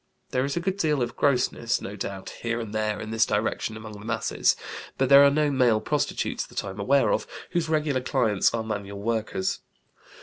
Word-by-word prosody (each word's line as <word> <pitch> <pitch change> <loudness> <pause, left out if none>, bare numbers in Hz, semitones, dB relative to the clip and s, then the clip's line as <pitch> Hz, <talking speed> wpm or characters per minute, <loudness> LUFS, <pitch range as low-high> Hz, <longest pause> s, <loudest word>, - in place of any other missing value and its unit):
There 130 +1 +1
is 140 +4 -3
a - - +2
good 190 +2 -2
deal 150 -8 +1
of 120 0 -4
grossness, 125 -4 +1
no 100 - -7
doubt, 95 -1 -5
here 115 0 -1
and 110 -2 -6
there 110 -1 -1
in 110 0 -6
this 110 0 +3
direction 110 +1 -1
among 110 0 -9
the 105 - -10
masses; 115 +2 +1 0.4
but 135 -1 +1
there 140 0 +9
are 140 - +7
no 150 +1 +1
male 125 -5 +3
prostitutes - - -1
(that - - -4
I 95 - -4
am 95 - -10
aware 135 +5 +3
of) - - -1 0.2
whose 170 -2 0
regular 150 -4 +1
clients 115 -7 +2
are 115 -1 -2
manual 100 -2 -5
workers. 110 -3 -1
115 Hz, 205 wpm, -26 LUFS, 110-140 Hz, 0.4 s, there